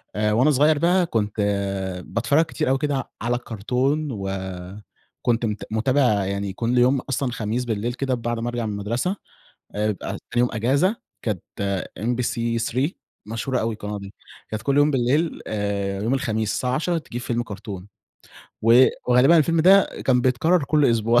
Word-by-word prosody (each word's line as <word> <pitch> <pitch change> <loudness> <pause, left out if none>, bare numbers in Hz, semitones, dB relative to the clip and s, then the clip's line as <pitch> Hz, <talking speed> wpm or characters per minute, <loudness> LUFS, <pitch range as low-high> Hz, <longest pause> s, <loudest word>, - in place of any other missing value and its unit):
آآ 105 0 +1
وأنا 130 +7 +4
صغير 150 +2 +4
بقى 175 +2 +3
كنت 105 -8 -1 0.7
باتفرج 140 +8 +2
كتير 155 -3 -2
أوي 135 - +3
كده 140 -2 -2
على 120 +1 0
الكرتون 125 +6 -1
وكنت 95 +4 -4
مت 105 -2 -3
متابع 115 -3 +2
يعني 100 0 -3
كل 120 +3 -1
يوم، 130 +2 +4
أصلًا 135 -1 -2
خميس 115 +2 -2
بالليل 115 +1 -2
كده 135 0 -2
بعد 120 -1 -2
ما 120 +1 -2
أرجع 120 -1 -3
من 110 - -2
المدرسة، 115 - -2 0.6
آآ 105 +1 +1
بقى 95 - -7 0.2
تاني 120 - +1
يوم 125 - +3
اجازة، 140 - +2 0.3
كانت 105 -7 -2 0.6
MBC3 120 +3 -1 0.4
مشهورة 115 +4 -2
أوي 115 0 -1
القناة 105 -1 -5
دي. 100 0 -10 0.4
كانت 110 0 -4
كل 140 +4 0
يوم 145 +1 +5
بالليل 140 +5 +1
آآ 100 -2 -2
يوم 115 +4 +1
الخميس 110 -6 -1
الساعة 125 0 -1
عشرة 165 +4 0
تجيب 120 -5 -7
فيلم 120 0 -1
كرتون 100 -3 -8 0.7
و 120 +3 +7 0.2
وغالبًا 125 +7 +6
الفيلم 165 +1 +3
ده 195 +4 +6 0.2
كان 125 -2 +3
بيتكرر 140 +7 +2
كل 150 +1 +2
أسبوع 115 +1 +3
120 Hz, 160 wpm, -23 LUFS, 110-135 Hz, 0.7 s, و